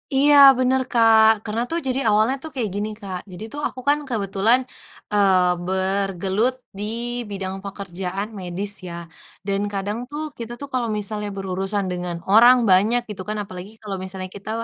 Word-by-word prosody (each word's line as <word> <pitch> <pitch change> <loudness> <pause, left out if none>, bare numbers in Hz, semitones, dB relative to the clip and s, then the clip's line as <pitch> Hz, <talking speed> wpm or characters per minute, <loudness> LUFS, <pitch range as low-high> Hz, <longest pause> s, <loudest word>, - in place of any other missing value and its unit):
Iya, 290 +2 +5 0.2
bener, 260 +1 +2
Kak. 225 -2 +6 0.2
Karena 220 +2 -2
tuh 335 +1 -1
jadi 260 +1 0
awalnya 215 +5 +3
tuh 315 - -6
kayak 225 -5 -1
gini, 210 +1 -2
Kak. 185 -2 -5
Jadi 180 +4 -8
tuh 290 - -5
aku 255 - -10
kan 295 - +4
kebetulan, 215 +2 +2 0.5
eee, 190 -3 +4
bergelut 195 +4 0 0.2
di 205 - -4 0.5
bidang 190 -1 -4
pekerjaan 195 0 -5
medis 185 +3 -3 0.2
ya. 170 - -7 0.5
Dan 200 0 0
kadang 200 +3 -2
tuh 295 +1 -5 0.2
kita 235 +1 -6
tuh 280 - -6
kalau 245 -2 0
misalnya 210 0 -2
berurusan 195 +1 -2
dengan 180 -1 -3 0.2
orang 240 +4 +8
banyak 215 +6 +4
gitu 190 -3 -6
kan, 215 - -2
apalagi 185 +1 -9
kalau 195 -2 -4
misalnya 190 0 -5
kita 200 +1 -9
205 Hz, 165 wpm, -22 LUFS, 190-230 Hz, 0.5 s, orang